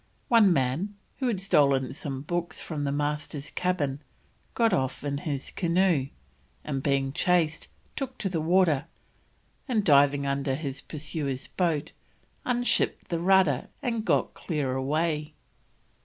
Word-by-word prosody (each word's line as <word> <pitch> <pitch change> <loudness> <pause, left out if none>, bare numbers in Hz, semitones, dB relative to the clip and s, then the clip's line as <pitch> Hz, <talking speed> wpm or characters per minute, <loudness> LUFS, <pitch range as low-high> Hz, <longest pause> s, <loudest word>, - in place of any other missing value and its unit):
One 225 -5 +6
man, 155 +8 0 0.2
who 260 - -1
had 220 -6 0
stolen 140 -8 +3
some 140 -4 -4
books 175 +1 -2
from 150 -3 -4
the 140 - 0
Master's 145 0 -3
cabin, 150 -6 -1 0.5
got 230 -2 +3
off 130 0 -1
in 140 -1 -2
his 145 -4 -3
canoe, 170 -5 +2 0.6
and 135 -3 -3
being 135 -1 0
chased, 165 -1 +1 0.3
took 265 -2 -4
to 200 - -2
the 170 -4 -1
water, 165 -4 +3 0.8
and 225 -6 +1
diving 140 -1 +5
under 140 -1 0
his 140 -2 -4
pursuers' 145 -3 -4
boat, 165 -5 -1 0.5
unshipped 245 -1 +1
the 170 - -1
rudder, 185 -6 +3 0.2
and 230 -4 -1
got - - +1
clear 145 -6 -2
away. 150 +3 -1
155 Hz, 135 wpm, -27 LUFS, 140-180 Hz, 0.8 s, One